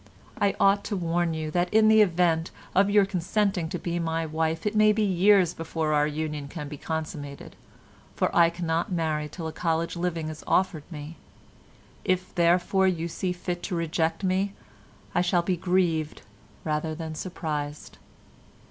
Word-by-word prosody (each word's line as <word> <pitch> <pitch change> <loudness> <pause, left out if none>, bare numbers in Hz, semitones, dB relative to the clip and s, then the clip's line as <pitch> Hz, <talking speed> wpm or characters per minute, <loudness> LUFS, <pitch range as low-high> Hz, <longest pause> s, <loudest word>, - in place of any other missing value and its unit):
"I 200 -1 +2
ought 200 +1 +4
to 210 - -2
warn 170 -1 0
you 155 -1 -3
that 175 +2 0
in 220 0 +5
the 220 0 +7
event 170 -3 +2 0.2
of 195 +1 +4
your 205 -1 +5
consenting 190 -1 0
to - - -3
be 175 0 -3
my 165 -1 -1
wife 160 +2 -1
it 210 +1 -1
may 215 0 +6
be 215 +1 +1
years 190 -2 +4
before 160 -1 -2
our 150 0 +3
union 150 -1 -3
can 150 0 -6
be 150 - -7
consummated, 150 -2 -6 0.6
for - - 0
I 170 -1 +6
cannot 170 0 -2
marry 155 -3 -1
till 165 +2 -7
a 160 - -4
college 165 0 -1
living 170 -2 -2
is 155 0 -8
offered 180 -4 0
me. 150 +1 -8 0.9
If, 185 0 -1
therefore, 180 +2 +3
you 170 -2 0
see 180 +2 -2
fit 175 0 -4
to 180 - -3
reject 165 +2 -1
me, 190 +1 +1 0.6
I 175 - +3
shall 175 -1 +2
be 180 +1 0
grieved 175 -3 0 0.4
rather 155 0 -2
than 160 0 -5
surprised. 150 -4 -5
170 Hz, 165 wpm, -26 LUFS, 160-185 Hz, 0.9 s, the